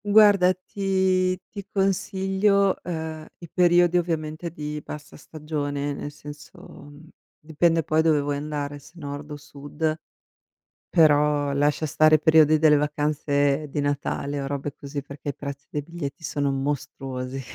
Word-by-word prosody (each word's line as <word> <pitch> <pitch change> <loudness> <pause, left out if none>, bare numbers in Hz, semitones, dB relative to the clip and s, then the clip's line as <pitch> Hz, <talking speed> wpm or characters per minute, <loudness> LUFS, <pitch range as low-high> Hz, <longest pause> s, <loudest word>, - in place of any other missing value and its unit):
Guarda 205 -3 +6
ti 185 -1 0
ti 200 -2 -7
consiglio, 195 0 +1
ehm, 160 -2 -5
i 170 - -11
periodi 175 0 +4
ovviamente 160 -1 -3
di 150 -1 -6
bassa 150 0 -9
stagione, 145 -2 -4
nel 145 - -6
senso, 145 0 -12
uhm, 145 +2 -14 0.3
dipende 165 +2 +1
poi 155 +2 +2
dove 160 -2 +3
vuoi 145 0 -1
andare, 145 -1 -4
se 140 - -18
nord 145 -2 -7
o 150 - -5
sud, 150 +1 -4 0.9
però 150 -2 +3
lascia 145 +2 +1
stare 155 +1 +5
periodi 155 0 +5
delle 155 -1 +5
vacanze 145 0 0
di 145 - -4
Natale 145 0 -2
o 135 - -4
robe 140 0 -4
così 140 0 -6
perché 140 0 -9
i 140 - -2
prezzi 140 0 -7
dei 150 - -3
biglietti 165 0 -7
sono 145 -2 -1
mostruosi. 135 -1 -4
150 Hz, 140 wpm, -24 LUFS, 145-170 Hz, 0.9 s, Guarda